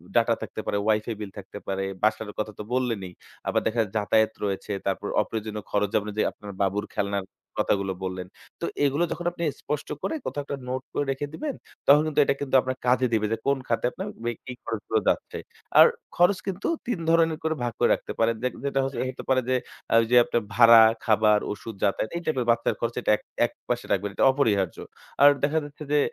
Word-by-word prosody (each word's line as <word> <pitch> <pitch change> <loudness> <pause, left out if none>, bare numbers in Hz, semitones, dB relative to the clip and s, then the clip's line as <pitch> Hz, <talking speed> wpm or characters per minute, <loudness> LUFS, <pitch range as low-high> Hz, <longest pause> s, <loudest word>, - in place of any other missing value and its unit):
data - - +4
থাকতে - - -5
পারে, - - 0
WIFI 110 +2 +1
বিল 105 -2 -6
থাকতে 100 +1 -9
পারে, 95 0 -1 0.2
বাসার 110 0 +1
কথা 105 0 -2
তো - - -4
বললেনই। 115 -8 -1 0.4
আবার - - +2
দেখা 115 +1 +1
যাতায়াত 110 +1 +2
রয়েছে, 100 +1 -3
তারপর 100 +1 -1
অপ্রয়োজনীয় 105 -1 -4
খরচ 105 -1 +1
যেমন 105 0 +1
যে, - - +3
আপনার 105 -1 -10
বাবুর 100 +2 0
খেলনার 100 -1 -1 0.4
কথাগুলো 95 -1 0
বললেন। 95 -1 -4 0.3
তো, - - 0 0.2
এগুলো 145 +4 +2
যখন 175 - -4
আপনি 170 0 -6 0.2
স্পষ্ট 150 -1 -3
করে 320 - -2
কোথাও 145 - -3
একটা 140 - -4
নোট 130 +1 -2
করে 145 - 0
রেখে 135 +2 -3
দিবেন, 290 - -3 0.3
তখন 145 +2 +8
কিন্তু 150 -1 0
এটা - - +1
কিন্তু 140 -1 -1
আপনার 130 0 -3
কাজে 125 0 +4
দিবে 110 -1 +2
যে, 115 - +1
কোন 140 0 +3
খাতে 115 - 0
আপনার 190 +2 -6 0.2
বা 120 - 0 0.2
কি 130 - -6
খরচগুলো 110 0 -1
যাচ্ছে। - - -1 0.4
আর - - +11 0.3
খরচ 180 +2 +4
কিন্তু 195 +1 -2 0.2
৩ 240 -8 -1
ধরনের 165 -1 +3
করে 160 0 0
ভাগ 120 -2 -1
করে - - +4
রাখতে - - -4
পারেন। 115 0 +3
দেখ 125 - +1
যেটা 135 -1 0
হচ্ছে 135 +1 -3
হতে 130 - -7
পারে 130 -1 +4
যে, 130 - +3 0.5
ওইযে 115 +2 +1
আপনার 120 - 0
ভাড়া, 115 0 +9 0.2
খাবার, 105 -1 +4
ওষুধ, 110 +2 -6
যাতায়াত 100 +2 +1
এই - - -4
টাইপের 130 -6 0
বাচ্চার 115 - +1
খরচ 115 0 -2
এটা - - +2
এক - - -20 0.2
একপাশে - - -4
রাখবেন। 100 +1 0
এটা - - +3
অপরিহার্য। 105 - +1 0.4
আর 145 - +10
দেখা 155 +2 +2
যাচ্ছে 145 +1 -9
যে, 150 - +4
115 Hz, 200 wpm, -26 LUFS, 105-140 Hz, 0.5 s, আর